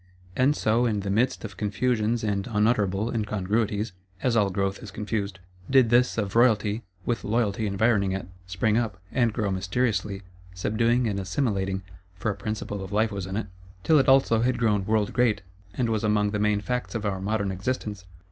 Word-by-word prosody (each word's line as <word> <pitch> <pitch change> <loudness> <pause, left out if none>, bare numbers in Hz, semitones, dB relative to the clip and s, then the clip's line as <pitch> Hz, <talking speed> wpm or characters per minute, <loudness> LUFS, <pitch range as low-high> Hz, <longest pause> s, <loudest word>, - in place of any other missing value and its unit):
And 135 +3 +3
so, 115 0 +2
in 105 -3 0
the 100 0 -3
midst 115 +4 +1
of 100 -4 -8
confusions 110 +2 0
and 100 -2 -1
unutterable 105 -1 +1
incongruities 105 0 -1 0.3
(as 125 -3 +2
all 105 -3 +3
growth 100 +2 -2
is 110 - -8
confused), 100 -1 -3 0.3
did 130 -4 +5
this 125 0 +3
of 105 -2 -2
Royalty, 110 -2 +3 0.2
with 120 -1 -1
Loyalty 110 -1 0
environing 100 -1 +2
it, 95 -2 -3 0.2
spring 105 +5 +1
up; 105 -5 -3
and 120 -3 +2
grow 105 -3 -1
mysteriously, 100 +1 -1 0.3
subduing 115 +6 +1
and 100 -2 -1
assimilating 95 -2 -1 0.3
(for 100 +4 -1
a - - -5
principle 105 -1 -4
of 95 - -8
Life 110 +2 +2
was 100 -2 -4
in 95 +2 -3
it); 110 - -2 0.4
till 155 +5 +5
it 135 - +3
also 130 -4 +5
had 125 +1 +1
grown 105 -5 +1
world 110 -1 +1
great, 120 -6 +2 0.3
and 125 - 0
was 110 -1 -1
among 105 -1 +2
the 105 - -1
main 105 0 +2
Facts 125 +2 -3
of 110 -1 -2
our 95 -2 -1
modern 100 0 -1
existence. 100 -1 -3
105 Hz, 185 wpm, -26 LUFS, 100-115 Hz, 0.4 s, did